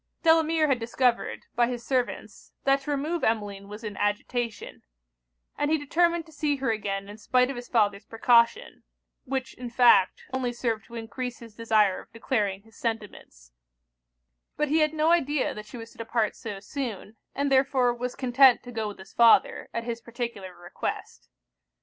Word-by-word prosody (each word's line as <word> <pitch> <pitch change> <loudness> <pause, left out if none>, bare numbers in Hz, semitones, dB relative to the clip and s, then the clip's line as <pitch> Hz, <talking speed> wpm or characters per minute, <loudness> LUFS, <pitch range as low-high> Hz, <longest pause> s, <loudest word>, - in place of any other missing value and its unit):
Delamere 320 -1 +4
had 270 -4 +1
discovered, 235 +1 0
by 240 0 +3
his 240 -1 -5
servants, 255 -2 -3
that 275 0 +3
to 275 - -8
remove 295 +3 -1
Emmeline 205 -3 -1
was 210 +3 -9
in 210 -2 -5
agitation; 210 +1 -2 0.8
and 290 - +1
he 315 - +3
determined 335 +3 +1
to 320 - -17
see 295 -1 0
her 265 -4 -1
again 200 -2 -3
in 205 +2 -11
spite 250 +4 +2
of - - -6
his 245 0 -8
father's 205 -3 +1
precaution 235 +1 +2 0.4
(which 265 0 -3
in 245 -1 -7
fact 235 -6 +4
only 255 -2 -1
served 230 -3 -2
to 235 - -12
encrease 235 +2 -5
his 230 -2 -13
desire 215 -4 +2
of - - -20
declaring 205 -4 -1
his 225 -1 -21
sentiments); 210 - -5 1.1
but 300 -1 0
he 315 +2 +3
had 305 0 +2
no 315 +2 +3
idea 295 -4 +1
that 210 0 -9
she 240 - -9
was 225 0 -9
to - - -21
depart 225 -1 -1
so 210 -3 -7
soon, 220 -2 -6 0.2
and 280 0 0
therefore 260 -2 +3
was 245 +1 -4
content 255 -1 +5
to 245 - -9
go 220 -2 -3
with 205 - -7
his 190 - -14
father, 235 -1 +4
at 230 - -3
his 235 0 -4
particular 235 -6 -6
request. 175 0 -6
240 Hz, 175 wpm, -27 LUFS, 215-270 Hz, 1.1 s, content